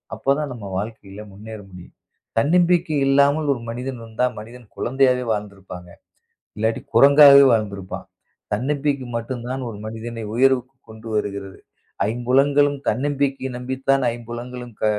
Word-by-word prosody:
அப்பதான் 140 +1 -1
நம்ம 115 -4 -9
வாழ்க்கையில 105 -1 -7
முன்னேற 110 +2 -10
முடியும். 90 -1 -13 0.4
தன்னம்பிக்கை 170 +2 +2
இல்லாமல் 140 +2 +3
ஒரு 120 - -8
மனிதன் 125 +2 -5
இருந்தா 115 +2 -2
மனிதன் 115 +2 -12
குழந்தையாவே 130 0 +2
வாழ்ந்து 105 -2 -3
இருப்பாங்க. 90 -2 -11 0.7
இல்லாட்டி 110 +1 0
குரங்காவே 140 0 +8
வாழ்ந்து 105 -3 0
இருப்பான். 95 -1 -8 0.5
தன்னம்பிக்கை 140 +3 -1
மட்டும்தான் 125 +2 -4
ஒரு 105 - -9
மனிதனை 115 +1 -6
உயர்வுக்கு 130 +1 +2
கொண்டு 110 +1 -11
வருகிறது. 100 -2 -4 0.5
ஐம்புலன்களும் 140 +4 +2
தன்னம்பிக்கை 135 +2 -1
நம்பித்தான் 130 +2 0
ஐம்புலன்களும் 120 +1 -8
க - - +1
125 Hz, 120 wpm, -21 LUFS, 110-135 Hz, 0.7 s, குரங்காவே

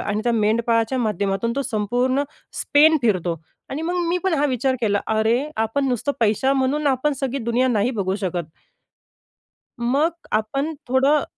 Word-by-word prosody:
आणि 210 +1 -2
त्या 240 - +2
मेंढपाळाच्या 230 +2 +1
माध्यमातून 210 -1 -1
तो 275 - +1
संपूर्ण 245 +3 0 0.4
स्पेन 315 +2 +5
फिरतो 185 -7 +1 0.4
आणि 285 +4 -4
मग 345 +2 -2
मी 355 - +1
पण 375 -4 +2
हा 290 - +1
विचार 260 0 0
केला, 205 -3 +1
अरे, 220 +3 +2
आपण 225 +5 0
नुसतं 255 +3 -1
पैशा 225 +4 +2
म्हणून 275 +2 0
आपण 275 +2 +1
सगळी 270 0 -1
दुनिया 240 +3 +1
नाही 225 0 +1
बघू 195 -6 -1
शकत. 175 -5 -3 1.3
मग 275 +8 +1 0.2
आपण 275 +9 -1
थोडं 270 +3 +3
245 Hz, 155 wpm, -22 LUFS, 215-275 Hz, 1.3 s, स्पेन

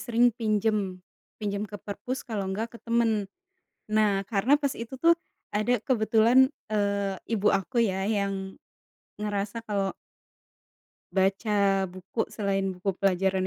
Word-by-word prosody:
sering 240 -1 +3
pinjam, 215 -4 0 0.4
pinjam 205 -1 -2
ke 205 -1 -8
perpus 215 +8 -5
kalau 200 -5 -2
enggak 225 +4 -3
ke - - -9
teman. 225 -4 +1 0.6
Nah, 210 -2 +2
karena 225 +8 +3
pas 280 -2 -1
itu 235 +3 -7
tuh, 335 +4 +6 0.4
ada, 240 +4 +2
kebetulan, 235 +2 +4 0.2
eee, 200 -1 +1
ibu 210 -2 +1
aku 235 +5 +1
ya, 190 -1 -1
yang, 195 -2 -2 0.6
ngerasa 205 +2 -2
kalau 195 -2 0 1.2
baca 195 0 +2
buku, 185 +5 -4
selain 195 -2 0
buku 185 +2 -1
pelajaran 190 0 +2
205 Hz, 125 wpm, -27 LUFS, 195-230 Hz, 1.2 s, tuh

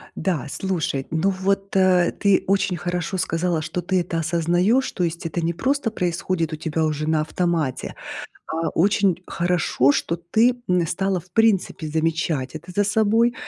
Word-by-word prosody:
Да, 175 -8 -1
слушай, 160 -7 -2
ну 160 +5 +1
вот, 195 +1 -1
э, 185 -2 +4
ты 200 -2 +3
очень 195 -2 +1
хорошо 175 +2 -3
сказала, 165 -1 0
что 175 +3 -3
ты 185 +1 +1
это 170 -1 -3
осознаешь, 175 +9 +1
то 180 - -2
есть 170 0 -3
это 165 +1 -2
не 165 +1 0
просто 265 - 0
происходит 175 -3 -1
у - - -1
тебя 160 0 -2
уже 155 0 -2
на 160 -1 +2
автомате, 160 -4 -1 0.5
а 165 +1 -1
очень 190 -1 +2
хорошо, 170 -6 +2
что 170 - -1
ты, 225 +9 +2
м, 180 -2 +2
стала 190 +3 -1
в 180 - -25
принципе 210 -7 +2
замечать 160 -3 -1
это 160 +4 -8
за 205 - +3
собой. 220 +3 +3
175 Hz, 165 wpm, -22 LUFS, 160-195 Hz, 0.5 s, э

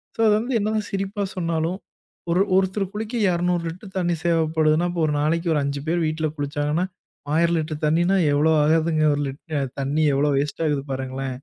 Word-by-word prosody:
So - - -22
அது 210 - +5
வந்து 245 +2 -2
என்னதான் 215 0 -1
சிரிப்பா 195 +1 -2
சொன்னாலும், 170 0 -1 0.5
ஒரு 180 +3 +3 0.2
ஒருத்தர் 190 0 0
குளிக்க 220 +3 -4 0.2
200 175 0 0
லிட்டர் 190 +3 -11
தண்ணி 175 -1 +1
தேவப்படுதுனா, 160 0 +2
அப்ப 170 -2 -2
ஒரு 150 - 0
நாளைக்கு 165 +3 0
ஒரு 145 - +2
5 140 0 -3
பேர் 170 0 +1
வீட்டுல 155 0 -1
குளிச்சாங்கன்னா, 145 +4 -1 0.5
1000 170 0 +3
லிட்டர் 155 -1 -5
தண்ணின்னா 175 +5 +2 0.2
எவ்ளோ 155 +3 +3
ஆகுதுங்க. 155 0 +2
ஒரு 145 - -2
லிட் 150 +3 -8
அ - - 0 0.2
தண்ணி 150 +3 +1
எவ்ளோ 145 +1 +2
வேஸ்ட் 145 +3 -2
ஆகுது 145 -2 0
பாருங்களேன்! 130 0 -4
165 Hz, 180 wpm, -23 LUFS, 150-180 Hz, 0.5 s, அது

